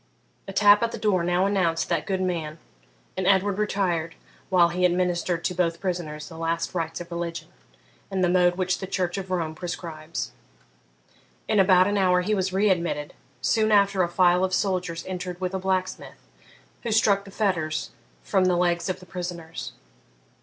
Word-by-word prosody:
A - - -5
tap 205 +1 +6
at 230 0 0
the - - -5
door 195 -5 +1
now 175 +2 +2
announced 180 -5 +1
that - - -1
good 190 -1 -1
man, 165 -4 -2 0.6
and 185 0 -1
Edward 200 +1 +3
retired 180 -6 -1 0.3
while 175 -2 +5
he 180 +2 -2
administered 175 -1 +1
to - - 0
both 170 -2 0
prisoners 170 -5 -4
the 165 -1 -10
last 165 0 -2
rites 165 -2 -3
of 175 - -10
religion, 170 -1 -4 0.6
in 190 -1 -1
the 180 - +4
mode 175 0 +3
which 185 0 0
the 190 - -5
Church 185 0 -1
of 190 -1 -7
Rome 165 -4 -1
prescribes. 165 -2 -5 1.2
In 215 -2 +2
about 185 -1 +6
an 205 0 +1
hour 180 -1 +3
he 210 +4 0
was 190 -2 0
re 195 +2 +3
admitted; 170 -5 -2 0.3
soon 220 -1 +2
after, 200 -2 +4
a 175 - +1
file 180 0 +3
of 185 0 +1
soldiers 180 -4 -1
entered 180 -1 -5
with 185 0 -3
a 190 - -1
blacksmith, 185 0 -3 0.5
who 235 - -3
struck 205 -2 +3
the 200 - -12
fetters 185 -7 -1 0.3
from 190 -2 +2
the 180 -1 +3
legs 175 +1 +1
of 185 0 -3
the - - -12
prisoners. 175 -2 -6
180 Hz, 180 wpm, -25 LUFS, 170-190 Hz, 1.2 s, tap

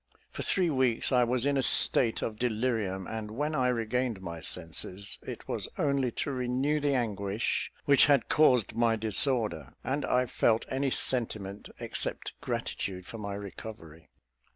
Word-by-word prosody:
For - - -6
three 180 -4 +1
weeks 130 -4 +2
I 125 -2 +5
was 125 +1 +1
in 140 -1 +2
a - - +3
state 120 -2 +3
of 110 -1 -4
delirium; 110 -5 -1
and 110 0 -5
when 145 +8 -2
I 130 -4 +2
regained 120 -1 -1
my 85 -3 -6
senses, 90 +6 -3
it - - -8
was - - -3
only 140 -3 +1 0.2
to - - -2
renew 130 +3 0
the 145 -1 +1
anguish 105 -3 -1
which 140 -1 +6
had 140 -4 +3
caused 125 -9 +3
my 115 -1 +3
disorder, 110 - +1
and 140 +3 -1
I 125 0 +2
felt 115 -1 +1
any 135 +1 0
sentiment 105 -7 0
except - - -3
gratitude 90 -2 -3
for 115 - -8
my 100 -1 -4
recovery. 95 -5 -9
115 Hz, 155 wpm, -29 LUFS, 100-130 Hz, 0.2 s, which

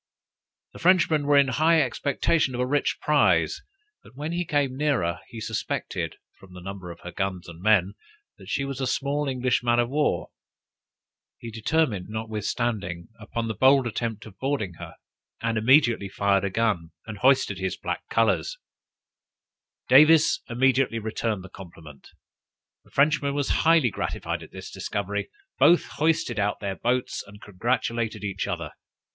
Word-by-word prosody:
The - - -11
Frenchman 165 -5 +3
was 145 -1 +6
in 140 - 0
high 160 +6 +3
expectation 140 0 0
of - - -4
a - - +1
rich 145 +3 0
prize, - - +2 0.4
but - - -18
when 150 +4 -4
he 175 +1 -2
came 145 -4 0
nearer, 130 - 0
he 115 - -9
suspected, 110 0 -3 0.2
from 90 -2 -15
the - - -8
number 95 0 -8
of 85 - -10
her 90 - -8
guns 95 -1 -3
and 85 0 -11
men, 100 -2 +3 0.5
that - - -12
she 140 - -1
was 135 -1 -5
a 130 - 0
small 145 +3 -1
English 125 -2 0
man 120 -1 +2
of 120 +1 +1
war; 150 +1 0 1.1
he 115 - -8
determined, 110 - 0
notwithstanding, 110 -4 -3
upon 115 +1 -4
the 110 - -2
bold 130 +3 +4
attempt 115 -1 -3
of 100 -3 -14
boarding 130 -9 -2
her, - - -9 0.4
and 115 0 -1
immediately 115 -3 +3
fired 100 0 +1
a - - 0
gun, 95 -5 0 0.2
and 110 -3 -8
hoisted 130 -7 +3
his 95 -1 -2
black - - -4
colors: 115 - +1 1.3
Davis 155 +4 +6
immediately 130 0 +2
returned 110 -2 -3
the - - -9
compliment. 85 -7 -13 0.8
The - - -21
Frenchman 140 0 +2
was 145 -2 -1
highly 160 -7 +3
gratified - - -3
at - - -11
this - - -9
discovery; 100 0 -3 0.3
both 175 - +5
hoisted 155 -7 0
out 100 0 0
their 100 -2 -3
boats, 125 +4 -1
and 105 +1 -13
congratulated 115 +2 -2
each 100 -2 -3
other. - - -4
115 Hz, 155 wpm, -25 LUFS, 100-140 Hz, 1.3 s, was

